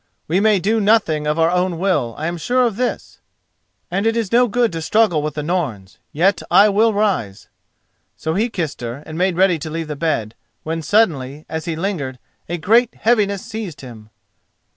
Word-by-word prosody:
We 175 +4 +1
may 210 0 +4
do 215 +4 +1
nothing 195 -8 +2
of 150 +1 0
our 165 +1 +3
own 180 -1 0
will, 150 - 0
I 155 - -4
am 170 +1 -2
sure 250 +9 +2
of 230 -4 -1
this, 250 +3 -3 0.7
and 195 +4 0
it 225 +1 +1
is 225 -5 -2
no 245 +1 +4
good 235 0 +1
to 165 -1 -4
struggle 210 -3 +2
with 150 -1 -4
the 150 - -3
Norns. 140 - -3
Yet 185 +7 +2
I 200 +4 +6
will 220 +3 +3
rise." 200 - -1 0.7
So 160 - -2
he 220 +7 0
kissed 165 - -4
her, 120 +4 -6
and 155 - -8
made 180 +1 0
ready 185 -3 +3
to 155 +2 -6
leave 160 0 -4
the 150 - -3
bed, 140 -9 -1 0.3
when 160 +1 -3
suddenly, 155 -8 +1
as 160 +1 -5
he 165 -2 -2
lingered, 160 -8 -3 0.3
a 175 - -2
great 225 +8 +3
heaviness 205 -4 +1
seized 200 -10 -6
him. 115 -5 -12
175 Hz, 195 wpm, -19 LUFS, 150-210 Hz, 0.7 s, I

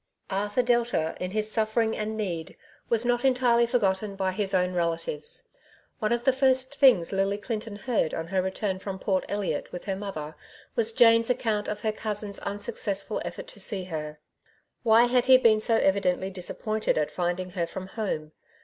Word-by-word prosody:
Abthub 205 +5 0
Delta^ 235 -10 +1
in 180 - -4
his 215 +2 -1
suffering 220 0 +1
and 220 +1 -3
need^ 170 -6 -4 0.3
was 230 0 +3
not 245 0 +1
entirely 245 -3 +3
forgotten 205 -4 0
by 190 -1 -1
his 195 +1 0
own 180 -1 +1
rektives. 180 - -2 0.6
One 215 -2 0
of 235 0 0
the 265 - +4
first 260 0 +2
things 255 - +5
Lily 195 +1 +1
Clinton 215 0 -5
heard 220 -7 -1
on 165 - -4
her 190 -1 +1
return 190 +1 -2
from 195 0 -5
Port 190 0 0
Elliot 190 -7 -2
with 180 - -7
her 195 -2 -2
mother, 165 -7 -6 0.4
was 230 -1 +3
Jane's 230 0 +5
account 220 -4 0
of 210 - -4
her 220 - 0
cousin's 210 -2 -3
unsuccessful 205 -1 -2
effort - - -6
to - - -8
see 200 -4 -1
her. 155 -4 -6 0.6
Why 230 0 +5
had 245 0 +2
he 260 -1 +8
been 225 -4 +4
so 225 +1 +3
evidently 190 -1 +1
disappointed 215 +4 -2
at 150 -1 0
finding 180 +1 -2
her 175 -2 -2
from 185 +2 -7
home? 185 -7 -4
210 Hz, 175 wpm, -27 LUFS, 185-230 Hz, 0.6 s, he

